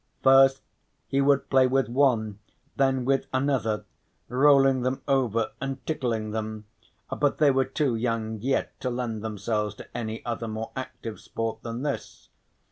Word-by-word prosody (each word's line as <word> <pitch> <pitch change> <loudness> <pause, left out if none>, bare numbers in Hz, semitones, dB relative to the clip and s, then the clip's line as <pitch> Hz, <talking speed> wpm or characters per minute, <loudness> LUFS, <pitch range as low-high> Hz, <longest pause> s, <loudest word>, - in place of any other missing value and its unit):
First 135 0 +6 0.4
he 135 - 0
would 140 0 +3
play 130 -1 +5
with 135 +1 +1
one, 120 -5 +1 0.4
then 135 -2 +1
with 135 0 +1
another, 130 -5 0 0.4
rolling 135 0 +5
them 130 +2 -2
over 120 -5 +1
and 135 -2 -4
tickling 115 -8 -2
them, 110 0 -4 0.5
but 145 -1 +1
they 150 -2 +5
were 135 0 +2
too 135 -1 0
young 110 -2 -2
yet 135 +4 -1
to 130 - -2
lend 120 -3 -3
themselves 105 0 -2
to - - -13
any 115 -2 -4
other 115 -1 -3
more 110 +1 -5
active 130 -4 -6
sport 115 -1 -4
than 115 +2 -5
this. 145 -2 -5
125 Hz, 150 wpm, -26 LUFS, 110-135 Hz, 0.5 s, First